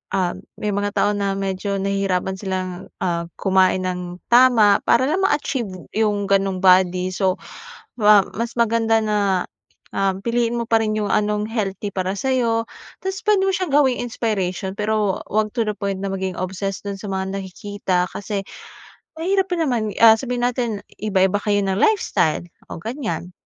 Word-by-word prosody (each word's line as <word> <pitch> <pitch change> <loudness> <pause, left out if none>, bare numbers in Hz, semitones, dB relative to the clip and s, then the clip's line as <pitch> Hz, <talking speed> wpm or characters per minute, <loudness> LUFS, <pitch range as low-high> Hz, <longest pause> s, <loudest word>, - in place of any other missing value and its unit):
ah, 185 -2 +1 0.3
may 210 - -1
mga 205 0 -1
tao 205 - +3
na 200 -1 -1
medyo 195 0 -2
nahihirapan 195 -1 -1
silang, 185 -2 -4 0.2
ah, 170 -2 -1
kumain 190 -1 +2
ng 180 -1 -5
tama 235 -5 +6
para 235 - +4
lang 335 +5 +1
ma-achieve 290 - 0 0.3
yung 210 -2 +1
ganong 195 -1 +1
body. 185 0 +4
So, 185 0 +1 0.6
ma 210 -3 +6
mas 235 +2 -2
maganda 225 -1 +3
na, 210 -1 0 0.8
um, 195 -1 0
piliin 235 +1 0
mo 235 - -2
pa 225 -1 +4
rin 215 0 -1
yung 210 - -1
anong 210 0 +1
healthy 205 -3 -3
para 185 0 -1
sa'yo, 235 -3 +1 0.4
tas 380 0 -3
puwede 415 -2 +4
mo - - +3
siyang 365 -5 -2
gawing 275 -4 +4
inspiration. 195 -6 -2
Pero, 210 -2 0
'wag 215 0 0
to 235 - +2
the 210 - 0
point 200 -2 -2
na 195 - -1
maging 190 -1 -3
obsessed 190 +1 -4
dun 200 -1 -4
sa 205 - -7
mga 190 +1 -2
nakikita, 190 -1 -2
kasi 200 0 -4 0.7
mahirap 380 +3 +1
pa - - +2
naman, 240 -9 0
ah, 225 -1 +9
sabihin 250 -2 -3
natin 235 -4 -2 0.2
iba-iba 195 -2 +2
kayo 205 -1 +2
ng 190 -1 0
lifestyle 300 - +2 0.3
o - - -4
ganyan, 225 -6 -4
205 Hz, 165 wpm, -21 LUFS, 190-230 Hz, 0.8 s, ah